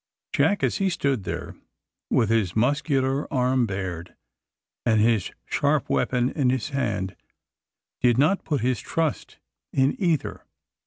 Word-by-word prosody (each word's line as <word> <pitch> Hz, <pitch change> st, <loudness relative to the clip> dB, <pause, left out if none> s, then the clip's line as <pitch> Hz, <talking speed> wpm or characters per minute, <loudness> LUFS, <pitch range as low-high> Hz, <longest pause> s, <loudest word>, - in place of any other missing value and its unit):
Jack, 205 Hz, -, +2 dB
as -, -, +1 dB
he 195 Hz, -1 st, +1 dB
stood 140 Hz, -, -1 dB
there, -, -, -5 dB, 0.5 s
with 110 Hz, -, +2 dB
his 105 Hz, -6 st, +1 dB
muscular 135 Hz, +2 st, +1 dB
arm 125 Hz, -2 st, +2 dB
bared 95 Hz, -3 st, -5 dB, 0.7 s
and 110 Hz, -2 st, +3 dB
his 110 Hz, -3 st, +2 dB, 0.2 s
sharp -, -, 0 dB
weapon 125 Hz, -, +1 dB
in 135 Hz, -5 st, +1 dB
his 130 Hz, +2 st, -1 dB
hand, 105 Hz, -9 st, -2 dB, 0.8 s
did 120 Hz, -1 st, +3 dB
not 155 Hz, +9 st, +3 dB
put 145 Hz, -4 st, -1 dB
his 125 Hz, 0 st, +1 dB
trust 160 Hz, -2 st, -2 dB, 0.3 s
in 135 Hz, +1 st, +2 dB
either. 170 Hz, -6 st, 0 dB
125 Hz, 135 wpm, -25 LUFS, 110-140 Hz, 0.8 s, and